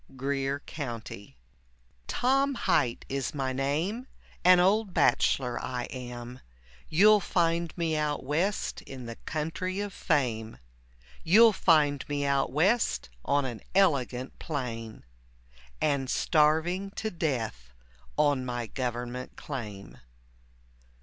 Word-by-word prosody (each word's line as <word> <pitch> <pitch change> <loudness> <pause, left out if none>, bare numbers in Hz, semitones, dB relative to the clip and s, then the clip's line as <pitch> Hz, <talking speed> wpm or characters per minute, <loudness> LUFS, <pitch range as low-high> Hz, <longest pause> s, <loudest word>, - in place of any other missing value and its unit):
GREER 135 +1 -2
COUNTY 115 - -7 0.7
Tom 275 +2 +2
Hight 125 - +1
is 135 +3 -3
my 135 -2 -1
name, 160 - -1 0.4
an 180 0 +7
old 195 +2 +2
bachelor 125 -3 +2
I 125 -1 -3
am, 125 -1 -7 0.5
You'll 210 +6 +6
find 170 -2 0
me 165 -2 0
out 150 -1 -1
West 165 +9 -1
in 130 -2 -9
the 115 0 -7
country 165 +5 -2
of 205 -1 -3
fame, 115 -8 -1 0.7
You'll 220 +6 +7
find 150 -7 +3
me 145 -1 -1
out 140 -1 +1
West 190 - +1
on 140 -1 +1
an 120 -4 -5
elegant 135 -9 +1
plain, 115 -7 -5 0.8
And 140 -3 0
starving 160 +5 +2
to 220 0 -3
death 115 - -3 0.5
on 145 -3 +3
my 120 -1 -3
government 125 +1 -4
claim. 105 -8 -7
145 Hz, 110 wpm, -28 LUFS, 125-175 Hz, 0.8 s, an